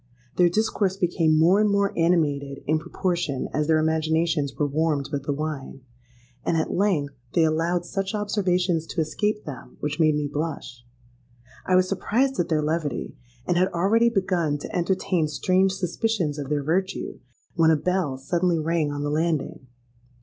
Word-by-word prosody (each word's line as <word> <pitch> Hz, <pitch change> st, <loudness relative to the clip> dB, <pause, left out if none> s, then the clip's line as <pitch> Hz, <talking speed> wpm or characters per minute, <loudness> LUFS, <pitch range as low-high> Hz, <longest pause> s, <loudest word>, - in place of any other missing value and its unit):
Their 175 Hz, -1 st, +4 dB
discourse 195 Hz, -1 st, 0 dB
became 165 Hz, -4 st, +2 dB
more 175 Hz, +6 st, +5 dB
and 210 Hz, -, +3 dB
more 200 Hz, 0 st, +1 dB
animated 145 Hz, -5 st, +1 dB
in 155 Hz, +1 st, +1 dB
proportion 170 Hz, -4 st, -2 dB
as 150 Hz, +1 st, 0 dB
their 160 Hz, -1 st, +4 dB
imaginations 160 Hz, -1 st, +1 dB
were 150 Hz, -, 0 dB
warmed 145 Hz, -1 st, 0 dB
with 140 Hz, -1 st, -3 dB
the -, -, +1 dB
wine; 145 Hz, -2 st, -4 dB, 0.6 s
and 165 Hz, -, +1 dB
at 160 Hz, -, -1 dB
length 175 Hz, -8 st, +1 dB, 0.2 s
they 165 Hz, -, +4 dB
allowed 165 Hz, +2 st, +1 dB
such 195 Hz, +3 st, -3 dB
observations 185 Hz, -5 st, 0 dB
to -, -, -4 dB
escape 210 Hz, +7 st, -1 dB
them 145 Hz, -4 st, -9 dB
which 150 Hz, +2 st, -3 dB
made 155 Hz, -2 st, +4 dB
me 150 Hz, -1 st, -1 dB
blush. 145 Hz, -5 st, -5 dB, 0.8 s
I 185 Hz, -, +3 dB
was 185 Hz, 0 st, +4 dB
surprised 240 Hz, +7 st, 0 dB
at 175 Hz, -, 0 dB
their 155 Hz, -2 st, +1 dB
levity, 150 Hz, -4 st, -2 dB, 0.3 s
and 175 Hz, -, +1 dB
had 185 Hz, +1 st, +4 dB
already 215 Hz, +7 st, +3 dB
begun 180 Hz, -8 st, 0 dB
to 145 Hz, -, -8 dB
entertain 180 Hz, -2 st, 0 dB
strange 185 Hz, +5 st, +2 dB
suspicions 180 Hz, -4 st, -1 dB
of 140 Hz, -1 st, -5 dB
their 145 Hz, -1 st, 0 dB
virtue, 185 Hz, +5 st, -2 dB, 0.3 s
when 165 Hz, -1 st, +4 dB
a 160 Hz, -, +5 dB
bell 170 Hz, -3 st, -1 dB
suddenly 170 Hz, +5 st, 0 dB
rang 160 Hz, -1 st, 0 dB
on 145 Hz, 0 st, -3 dB
the 145 Hz, -, -1 dB
landing. 155 Hz, -4 st, -1 dB
165 Hz, 165 wpm, -24 LUFS, 150-185 Hz, 0.8 s, more